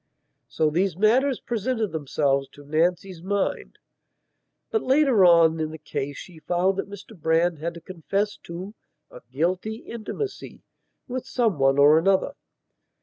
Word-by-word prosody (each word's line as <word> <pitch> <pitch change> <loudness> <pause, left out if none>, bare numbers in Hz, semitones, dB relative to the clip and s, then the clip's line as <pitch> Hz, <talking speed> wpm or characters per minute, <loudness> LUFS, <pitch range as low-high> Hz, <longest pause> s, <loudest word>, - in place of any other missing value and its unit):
So 155 -1 0
these 175 +1 0
matters 250 +6 +3
presented 230 -2 -2
themselves 140 -2 0
to 145 - -14
Nancy's 170 +4 0
mind. 200 +2 -2 0.9
But 445 - +1
later 265 -6 +3
on 165 -2 +5
in 155 -1 -1
the 160 - -8
case 145 -2 -5
she 175 -4 -11
found 180 +4 0
that 195 - -4
Mr 205 +2 -11
Brand 165 0 +1
had 170 +2 -4
to 170 - -10
confess 195 +5 -3
to 180 +4 -8 0.4
a - - -12
"guilty 180 +9 -1
intimacy" 235 - -7 0.4
with 255 0 -5
some 225 - 0
one 135 0 +3
or 145 +2 +6
other. 190 -1 +1
180 Hz, 145 wpm, -24 LUFS, 160-215 Hz, 0.9 s, or